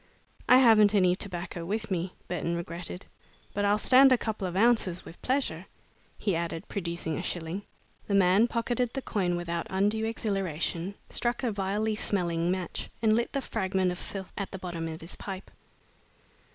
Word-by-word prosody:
"I 255 - +9
haven't 215 -5 +6
any 180 -2 +4
tobacco 175 -2 -4
with 215 +4 -3
me," 180 0 -2
Burton 170 -1 -2
regretted, 170 +2 -6 0.5
"but 205 0 0
I'll 205 +1 +4
stand 260 +5 +7
a 255 - +6
couple 220 -4 -3
of 180 - -5
ounces, 200 -4 +3
with 165 - -12
pleasure," 250 - -1 0.5
he 200 -5 0
added, 170 +2 -3
producing 170 -4 -3
a - - -2
shilling. 175 +1 -3 0.5
The 200 - +1
man 195 +4 +5
pocketed 235 +1 -1
the 270 - -4
coin 180 -5 0
without 170 -1 -3
undue 205 +3 +1
exhilaration, 195 -4 -2 0.2
struck 240 +1 0
a 240 - +1
vilely 205 +2 -1
smelling 175 -5 0
match, 185 -1 -3
and 220 -1 +4
lit 235 +1 0
the 275 - 0
fragment 190 -5 0
of 180 - -5
filth 190 -2 -6
at 200 - -3
the 190 - -6
bottom 175 -3 -4
of 160 0 -6
his 165 - -8
pipe. 195 -1 -7
190 Hz, 170 wpm, -29 LUFS, 175-220 Hz, 0.5 s, I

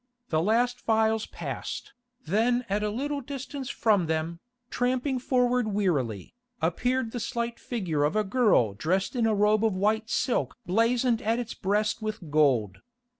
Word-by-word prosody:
The 155 -1 +2
last 240 +6 +1
files 220 -1 +1
passed, - - -6 0.3
then 235 +8 +1
at 205 +2 0
a 210 - 0
little 280 +6 -2
distance 275 0 -6
from 205 -10 +2
them, 160 +1 -2 0.3
tramping 255 +2 0
forward 250 -2 +1
wearily, 150 - -1 0.3
appeared 245 +9 0
the 245 - -4
slight 235 +1 -3
figure 180 - -2
of 150 +7 +1
a 215 - +3
girl 205 - +3
dressed 185 - -1
in 235 -2 +2
a 220 - +2
robe 210 +1 +3
of 220 -4 +2
white 215 +3 +1
silk 250 +1 0
blazoned 230 +4 +2
at 225 0 +1
its 240 -2 -4
breast 210 +3 0
with 215 -7 -5
gold. 130 -10 +2
220 Hz, 155 wpm, -27 LUFS, 185-245 Hz, 0.3 s, a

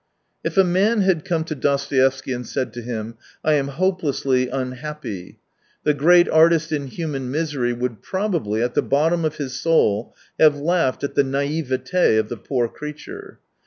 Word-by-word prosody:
If - - -3
a 195 - +7
man 195 +5 +2
had 185 -5 +2
come 165 -2 0
to 160 - -5
Dostoevsky 135 -2 +1
and 125 0 -5
said 130 - -3
to 120 - -6
him, 115 -1 -5
" - - -29
I 155 - +4
am 140 -2 +1
hopelessly 140 -6 0
unhappy," 130 -6 -5 0.5
the 150 - +3
great 175 +5 +5
artist 160 0 +4
in 145 -3 -2
human 135 -3 -4
misery 145 -4 -1
would 120 -3 -4
probably, 170 - -1
at 120 0 -1
the - - +2
bottom 160 +5 +1
of 155 -1 -1
his 135 -3 -5
soul, 115 -10 +1 0.2
have 155 -2 +6
laughed 155 -3 0
at 140 - -2
the 140 - +3
naivete 140 0 0
of 110 0 0
the 120 - -5
poor 120 +2 -1
creature. 380 - -9
145 Hz, 170 wpm, -22 LUFS, 130-165 Hz, 0.5 s, a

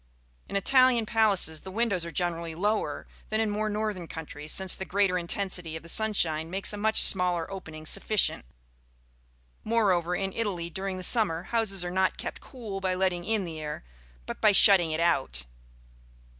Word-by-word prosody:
In - - -6
Italian 250 +3 +3
palaces 205 -8 +2
the 190 - -11
windows 200 -3 -1
are - - -6
generally 170 -2 -3
lower 210 +5 -2 0.2
than 215 - -1
in 220 -1 0
more 215 +1 -2
northern 210 -4 -3
countries, 155 -2 -8
since 190 -1 +3
the - - -3
greater 195 -1 0
intensity 180 -2 -3
of 160 - -8
the 170 - -10
sunshine 165 -7 0
makes 195 +3 -1
a - - -6
much 220 +1 +5
smaller 180 -3 +3
opening 160 -5 -9
sufficient; 195 - +1 1.2
moreover, 185 -6 +1
in 195 0 -3
Italy, 180 -7 -3
during 190 +1 -4
the 185 - -6
summer, 180 -6 +4
houses 195 -4 0
are 175 - -4
not 190 +1 0
kept - - -7
cool 220 -7 -8
by 185 -1 -1
letting 185 -2 -1
in 220 -2 0
the 165 -3 -7
air, 150 - -6 0.4
but - - -8
by 215 - +5
shutting 190 -4 +6
it 155 +1 -2
out. 135 - 0
190 Hz, 170 wpm, -27 LUFS, 170-210 Hz, 1.2 s, shutting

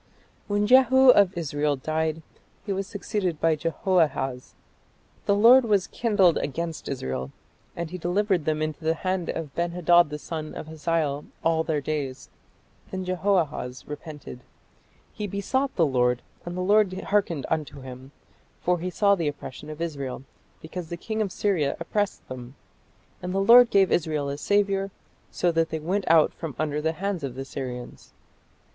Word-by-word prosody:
" - - -35
When 205 0 +1
Jehu 260 +2 +6
of 200 -6 +4
Israel 145 -2 0
died, 155 +3 -2 0.4
he 200 - -1
was 195 0 -3
succeeded 195 -5 -3
by 165 -1 +3
Jehoahaz. 150 -5 0 0.7
"The 200 - +4
Lord 240 +5 +7
was 205 -5 +2
kindled 205 -7 +2
against 165 +3 -4
Israel, 65 - -4 0.4
and 170 -1 -4
he 185 - -5
delivered 180 -1 0
them 155 0 0
into 155 +1 -4
the 160 +1 +1
hand 185 0 -2
of 155 -4 -4
Ben 170 0 -1
hadad 175 -2 +4
the 150 - -4
son 155 0 -6
of - - -6
Hazael 155 -2 -1 0.2
all 165 -1 +2
their 155 -3 -1
days." 140 -3 -4 0.6
Then 185 -1 -4
Jehoahaz 175 -9 -1
repented. 150 -3 -8 0.7
He 210 -1 -4
"besought 255 +8 -1
the 165 - +4
Lord, 125 -3 +1 0.2
and 175 +1 -4
the - - -1
Lord 205 +1 +4
hearkened 190 -7 0
unto 150 -3 -3
him: 130 +1 -10 0.5
for 180 0 +1
he 180 +2 -3
saw 200 +3 +3
the 170 -6 0
oppression 145 0 -6
of 155 0 -8
Israel, 140 -6 -4 0.4
because 165 +1 -7
the 170 - -5
king 220 +5 -3
of 200 -3 -1
Syria 175 -10 0
oppressed 205 +4 -2
them. 130 0 -8 0.7
And 180 +1 -4
the - - +2
Lord 235 +4 +8
gave 195 -2 +4
Israel 155 -4 0
a 140 +1 -4
saviour, 200 0 +1 0.4
so 175 - +1
that 165 0 +1
they 160 - -3
went 185 +6 -2
out 160 -2 +5
from 160 -5 -6
under 150 -1 -1
the 160 +1 0
hands 190 -1 -3
of 130 -3 -4
the 135 +1 -5
Syrians." 125 -3 -7
165 Hz, 165 wpm, -25 LUFS, 150-195 Hz, 0.7 s, Lord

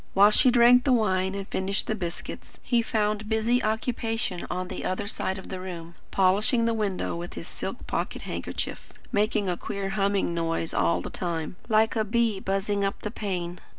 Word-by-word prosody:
While 200 +2 +7
she 255 - +5
drank 245 0 +6
the 270 - +2
wine 190 -4 +2
and 195 -1 -4
finished 195 +2 -1
the - - -1
biscuits, 175 -5 -6
he 240 -2 +2
found 215 -1 -1
busy 230 +3 +2
occupation 225 -3 -1
on 180 0 -2
the - - -5
other 185 +2 -1
side 190 -2 -1
of 190 - -9
the 185 - -4
room, 170 -2 -7 0.2
polishing 205 +5 +3
the 230 - +2
window 205 -6 -1
with 175 +1 -6
his - - -6
silk - - -6
pocket - - -3
handkerchief; - - -5 0.2
making 210 -1 +1
a 180 - +1
queer 195 +2 -4
humming 195 -2 +1
noise 165 -1 -1
all 85 +1 +2
the - - -6
time, 170 -2 -3
like 220 +1 +3
a 220 - +2
bee 220 -1 +1
buzzing 195 +1 0
up 195 0 -2
the 210 - -3
pane. 180 -6 -3
200 Hz, 185 wpm, -27 LUFS, 185-220 Hz, 0.2 s, While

